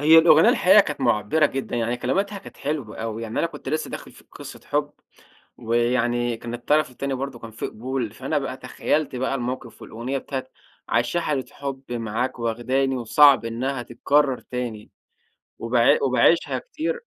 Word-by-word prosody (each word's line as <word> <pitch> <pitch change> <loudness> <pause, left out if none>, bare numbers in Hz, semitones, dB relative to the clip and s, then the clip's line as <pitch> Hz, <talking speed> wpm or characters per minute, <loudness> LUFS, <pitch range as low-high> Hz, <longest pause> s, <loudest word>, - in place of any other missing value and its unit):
هي 160 +2 +8
الأغنية 160 -1 +7
الحقيقة 190 +3 +6
كانت 150 -7 -3
مُعبِّرة 120 +5 +3
جدًا، 135 -3 -4
يعني 120 +1 0
كلماتها 200 +9 -1
كانت - - -13
حلوة 140 -7 -4
أوي، 115 0 -4
يعني 115 0 -4
أنا - - +2
كنت 150 -4 -9
لسه 155 +2 -2
داخِل - - -8
في - - -18
قِصّة - - -10
حُب - - -1 0.7
ويعني 120 0 +1
كان 120 +1 -7
الطرَف 145 +3 +1
التاني 135 +2 -3
برضه 130 -2 -5
كان 115 - -9
في 110 - -5
قبول، 125 -1 -4
فأنا 135 +5 -2
بقى 135 -2 -4
تخيّلت 145 -2 -2
بقى 130 +2 -1
الموقِف 125 -1 -5
والأغنية 125 +5 -4
بتاعة 130 -1 -5 0.4
"عايشة 120 +9 +1
حالة 140 -5 -1
حُب 135 -2 -6
معاك 115 +2 -2
واخداني 130 +3 0
وصعب 135 +2 +5
إنها 125 +3 -2
تتكرر 135 +3 +1
تاني" 120 -4 -6 0.7
وباع 115 +1 +3
وباعيشها 135 +5 +3
كتير 475 +2 -4
130 Hz, 160 wpm, -23 LUFS, 120-145 Hz, 0.7 s, هي